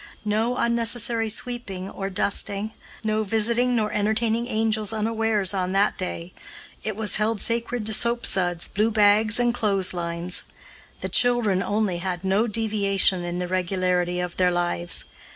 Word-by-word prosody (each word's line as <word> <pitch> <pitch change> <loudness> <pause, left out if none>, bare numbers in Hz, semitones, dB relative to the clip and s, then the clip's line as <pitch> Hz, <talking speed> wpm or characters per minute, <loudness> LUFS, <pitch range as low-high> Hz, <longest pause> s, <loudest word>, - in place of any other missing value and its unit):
No 220 +4 0
unnecessary 235 -1 0
sweeping 220 -5 -4
or 195 0 -5
dusting, 200 +2 +1 0.3
no 215 0 0
visiting 235 +4 +1
nor 215 -2 -1
entertaining 220 +3 0
angels 220 -2 0
unawares 220 -2 0
on 185 -1 -2
that 200 +1 +2
day 180 -2 -4 0.5
it 215 -2 -2
was 215 -1 +2
held 215 +1 0
sacred 235 0 -1
to 220 - +1
soap 235 +2 +1
suds, 175 -2 +3
blue 215 +2 0
bags, 215 +1 +3
and 240 -1 +2
clotheslines. 180 -5 -1 0.6
The - - -3
children, 240 -6 +2
only, 205 -4 -1
had 180 0 -4
no 195 +4 +1
deviation 200 -4 +2
in 175 0 -4
the 180 0 -3
regularity 180 -1 -1
of 180 -1 -4
their 180 -1 +3
lives. 175 - -1
210 Hz, 145 wpm, -24 LUFS, 185-225 Hz, 0.6 s, suds